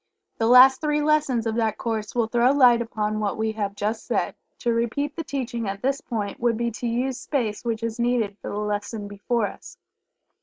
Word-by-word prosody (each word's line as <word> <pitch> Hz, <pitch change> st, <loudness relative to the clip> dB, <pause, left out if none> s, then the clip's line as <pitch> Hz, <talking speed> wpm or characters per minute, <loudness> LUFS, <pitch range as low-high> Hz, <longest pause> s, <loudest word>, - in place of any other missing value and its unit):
The 225 Hz, -, +2 dB
last 255 Hz, +2 st, +8 dB
three 300 Hz, -1 st, +1 dB
lessons 295 Hz, -6 st, +2 dB
of 225 Hz, -, 0 dB
that 220 Hz, -2 st, 0 dB
course 220 Hz, -2 st, -3 dB
will 235 Hz, -2 st, +2 dB
throw 240 Hz, +3 st, +3 dB
light 250 Hz, -4 st, +6 dB
upon 215 Hz, -2 st, -2 dB
what 205 Hz, -2 st, -1 dB
we 220 Hz, 0 st, 0 dB
have 205 Hz, -2 st, -3 dB
just 210 Hz, +2 st, -3 dB
said -, -, 0 dB, 0.2 s
To 240 Hz, -2 st, 0 dB
repeat 260 Hz, +6 st, -1 dB
the 330 Hz, -, -4 dB
teaching 250 Hz, -6 st, -3 dB
at 195 Hz, 0 st, -6 dB
this 275 Hz, +2 st, 0 dB
point 205 Hz, -4 st, -4 dB
would 235 Hz, -2 st, +1 dB
be 235 Hz, 0 st, -1 dB
to 235 Hz, +2 st, -4 dB
use 250 Hz, +2 st, -1 dB
space 230 Hz, -8 st, -2 dB
which 230 Hz, -1 st, -2 dB
is 230 Hz, 0 st, -3 dB
needed 235 Hz, -4 st, +1 dB
for -, -, -6 dB
the 205 Hz, -, -4 dB
lesson 210 Hz, 0 st, -3 dB
before 205 Hz, +3 st, -1 dB
us.) -, -, -9 dB
230 Hz, 205 wpm, -24 LUFS, 215-250 Hz, 0.2 s, last